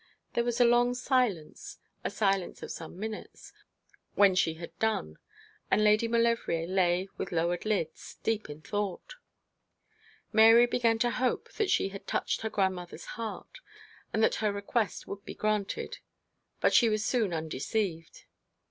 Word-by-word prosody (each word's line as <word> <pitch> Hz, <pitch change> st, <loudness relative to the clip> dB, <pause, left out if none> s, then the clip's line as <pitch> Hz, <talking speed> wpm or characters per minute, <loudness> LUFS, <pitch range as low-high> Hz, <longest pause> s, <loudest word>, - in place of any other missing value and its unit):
There 235 Hz, -, +1 dB
was 240 Hz, 0 st, -1 dB
a 245 Hz, -, +7 dB
long 240 Hz, +1 st, +4 dB
silence, 245 Hz, -, -1 dB, 0.3 s
a -, -, -1 dB
silence 195 Hz, -3 st, 0 dB
of -, -, -6 dB
some 165 Hz, +2 st, -8 dB
minutes, 220 Hz, +1 st, -7 dB, 0.6 s
when 200 Hz, -2 st, +6 dB
she 165 Hz, -3 st, +1 dB
had 165 Hz, 0 st, -9 dB
done; 215 Hz, -, -1 dB, 0.5 s
and 210 Hz, -, +3 dB
Lady 215 Hz, +2 st, +4 dB
Maulevrier 230 Hz, -8 st, +1 dB
lay 180 Hz, 0 st, +1 dB
with 195 Hz, -, -4 dB
lowered 175 Hz, +3 st, 0 dB
eyelids, 190 Hz, -7 st, -2 dB
deep 220 Hz, -6 st, -1 dB
in 150 Hz, +1 st, -9 dB
thought. 205 Hz, -3 st, -3 dB, 1.2 s
Mary 225 Hz, +2 st, +8 dB
began 235 Hz, -2 st, +2 dB
to 240 Hz, +1 st, +1 dB
hope 255 Hz, +1 st, -1 dB
that 420 Hz, -3 st, 0 dB
she 195 Hz, -, +2 dB
had 195 Hz, 0 st, -10 dB
touched -, -, -1 dB
her 220 Hz, -, -2 dB
grandmother's 190 Hz, -4 st, -2 dB
heart, 225 Hz, -1 st, -7 dB, 0.5 s
and 220 Hz, -, +1 dB
that -, -, +4 dB
her 210 Hz, -1 st, +2 dB
request 200 Hz, +2 st, -2 dB
would 200 Hz, 0 st, -7 dB
be -, -, -8 dB
granted: 215 Hz, -, -2 dB, 0.6 s
but -, -, +3 dB
she 235 Hz, -, +6 dB
was 215 Hz, 0 st, 0 dB
soon 225 Hz, -7 st, +1 dB
undeceived. 165 Hz, +2 st, -3 dB
210 Hz, 150 wpm, -29 LUFS, 180-230 Hz, 1.2 s, Mary